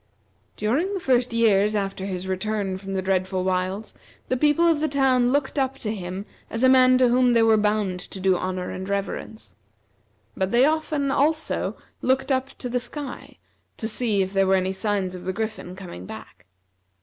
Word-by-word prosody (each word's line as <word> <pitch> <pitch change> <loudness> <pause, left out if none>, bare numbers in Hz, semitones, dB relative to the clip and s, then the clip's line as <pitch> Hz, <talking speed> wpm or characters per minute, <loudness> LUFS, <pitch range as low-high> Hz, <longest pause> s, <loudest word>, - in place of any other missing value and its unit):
During 290 - 0
the - - -2
first 250 -6 +2
years 215 -2 +3
after 195 -1 -2
his 185 -1 -4
return 195 0 -2
from 195 0 -6
the 190 - -1
dreadful 185 0 0
wilds, 185 +3 -2 0.4
the 255 - +2
people 300 +5 +3
of 325 -3 +3
the 310 - +1
town 260 -4 +2
looked 285 +1 0
up 270 0 0
to 215 -4 -3
him 185 0 -5 0.2
as 225 +2 -3
a 260 - +7
man 255 -1 +6
to 255 -1 +4
whom 250 0 +4
they 230 -1 +4
were 225 -1 +5
bound 210 -3 0
to 190 - -9
do 190 0 +3
honor 185 0 -3
and 190 +1 -6
reverence; 200 +2 -4 0.8
but 190 0 -1
they 240 +5 +4
often, 305 -2 0
also, 310 +3 0 0.3
looked 265 +1 +1
up 265 0 +1
to 250 - -5
the 245 0 0
sky 265 +3 -8 0.4
to 220 - -3
see 215 -3 +1
if 190 +1 -6
there 195 -1 +3
were 190 - +4
any 190 0 0
signs 195 -2 -1
of 180 - -8
the 185 - -2
Griffin 215 -3 -4
coming 175 - -9
back. - - -11
215 Hz, 190 wpm, -24 LUFS, 190-260 Hz, 0.8 s, a